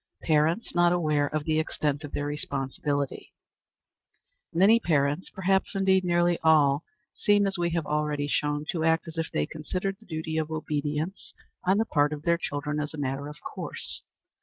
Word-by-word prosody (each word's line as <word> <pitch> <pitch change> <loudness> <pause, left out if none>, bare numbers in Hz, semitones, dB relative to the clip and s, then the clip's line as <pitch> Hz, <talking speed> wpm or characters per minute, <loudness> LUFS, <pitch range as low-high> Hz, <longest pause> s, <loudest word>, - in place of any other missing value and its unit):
Parents 160 +6 +2
not 175 0 +4
aware 155 -4 +2
of 155 +1 -2
the 155 0 +1
Extent 150 -1 -1
of 145 - -7
their 145 - -2
Responsibility. 140 -1 -3 1.2
Many 200 +7 +5
parents, 150 -3 +1
perhaps 190 +2 0
indeed 190 -1 +3
nearly 175 -1 +2
all, 150 -2 +4 0.3
seem, 205 -1 +3
as 195 0 0
we 175 -1 0
have 165 -3 0
already 150 -1 -1
shown, 145 +1 0
to 165 -3 -2
act 165 +1 +2
as 165 0 -6
if 165 - -2
they 75 - 0
considered 185 - -4
the 220 - -20
duty 160 -1 -2
of 155 -1 -2
obedience 155 +3 -3 0.3
on 190 +2 +4
the 220 - +2
part 145 -5 +2
of 150 0 -7
their 170 0 +2
children 150 -1 -3
as 150 +1 -3
a - - -9
matter 140 0 -2
of 150 0 -9
course. - - -4
155 Hz, 175 wpm, -27 LUFS, 145-175 Hz, 1.2 s, Many